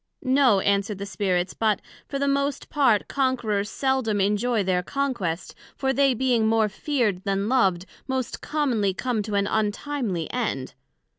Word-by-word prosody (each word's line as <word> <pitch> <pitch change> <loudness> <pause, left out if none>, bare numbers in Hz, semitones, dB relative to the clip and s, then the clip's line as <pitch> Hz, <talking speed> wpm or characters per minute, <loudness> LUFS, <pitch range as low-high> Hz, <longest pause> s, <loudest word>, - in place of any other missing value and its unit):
No, 255 -6 +4
answered 200 +1 +1
the 200 - -5
Spirits, 185 -3 -1
but, 215 -2 +1 0.3
for 280 - -3
the 280 0 0
most 280 0 -1
part, 260 -8 +3
Conquerers 235 -7 0
seldom 260 -6 0
enjoy 210 +3 +1
their 180 -1 +1
conquest, 220 - -2 0.2
for 265 -1 0
they 275 -1 +3
being 240 -3 +2
more 220 -1 +3
feared 210 -4 -1
then 195 0 0
loved, 195 -8 +2 0.2
most 260 -2 -3
commonly 240 -11 0
come 245 -2 -1
to 205 0 -4
an 200 0 +2
untimely 210 - -1
end. 210 - -2
220 Hz, 150 wpm, -25 LUFS, 200-265 Hz, 0.3 s, No